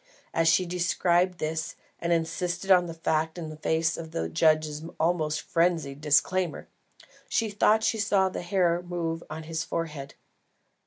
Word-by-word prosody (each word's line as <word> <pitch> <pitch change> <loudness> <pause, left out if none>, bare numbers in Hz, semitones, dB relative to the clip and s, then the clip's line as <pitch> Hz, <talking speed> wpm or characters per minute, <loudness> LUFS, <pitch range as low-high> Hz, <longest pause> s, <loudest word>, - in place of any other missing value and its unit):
As 165 0 +2
she 185 +3 +4
described 180 0 +1
this, 160 0 -3 0.2
and 170 - -2
insisted 175 +3 -1
upon 180 -2 +6
the 165 - -7
fact 160 0 -1
in 155 -2 -6
face 160 +1 0
of 165 -1 -7
the 80 - -3
judge's 155 - +2 0.2
almost 160 -2 +1
frenzied 165 -5 0
disclaimer, 165 +4 +1 0.6
she 225 -2 0
thought 215 +2 +3
she 225 0 +1
saw 200 -2 +3
the 190 - -4
hair 175 -1 +1
move 170 -2 -3
on 155 +1 -6
his 160 0 -3
forehead. 150 -5 -5
165 Hz, 150 wpm, -27 LUFS, 155-180 Hz, 0.6 s, upon